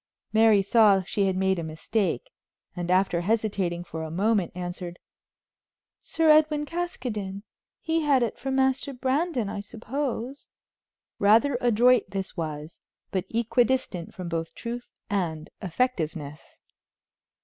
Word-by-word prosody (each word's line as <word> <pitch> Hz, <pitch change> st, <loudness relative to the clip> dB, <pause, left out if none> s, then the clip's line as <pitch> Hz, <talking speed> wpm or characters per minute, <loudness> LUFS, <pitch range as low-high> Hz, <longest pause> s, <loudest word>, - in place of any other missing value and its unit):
Mary 220 Hz, -2 st, +5 dB
saw 200 Hz, -2 st, +5 dB
she 195 Hz, +2 st, 0 dB
had 190 Hz, -, 0 dB
made 190 Hz, -1 st, +1 dB
a -, -, -3 dB
mistake, 200 Hz, -, -2 dB, 0.4 s
and, 175 Hz, -1 st, -4 dB
after 185 Hz, -2 st, +2 dB
hesitating 195 Hz, -4 st, 0 dB
for 165 Hz, -2 st, -6 dB
a 160 Hz, -, -4 dB
moment, 195 Hz, +2 st, +1 dB
answered: 175 Hz, -1 st, -5 dB, 1.0 s
"Sir 325 Hz, -1 st, 0 dB
Edwin 305 Hz, -1 st, +5 dB
Caskoden. 240 Hz, -, -4 dB, 0.4 s
He 325 Hz, 0 st, 0 dB
had 280 Hz, -5 st, +3 dB
it 230 Hz, -, -3 dB
from 270 Hz, 0 st, -2 dB
Master 265 Hz, +1 st, +1 dB
Brandon, 260 Hz, -, 0 dB
I 200 Hz, -, -4 dB
suppose." 250 Hz, +4 st, -4 dB, 0.7 s
Rather 225 Hz, +7 st, +5 dB
adroit 240 Hz, -2 st, +4 dB
this 195 Hz, -1 st, -4 dB
was, 155 Hz, -1 st, -5 dB, 0.3 s
but 190 Hz, -1 st, -1 dB
equidistant 235 Hz, -5 st, 0 dB
from 180 Hz, -2 st, -6 dB
both 165 Hz, -1 st, -3 dB
truth 240 Hz, +1 st, -6 dB, 0.2 s
and 165 Hz, -7 st, -2 dB
effectiveness. 165 Hz, -, -3 dB
205 Hz, 125 wpm, -26 LUFS, 180-255 Hz, 1.0 s, Mary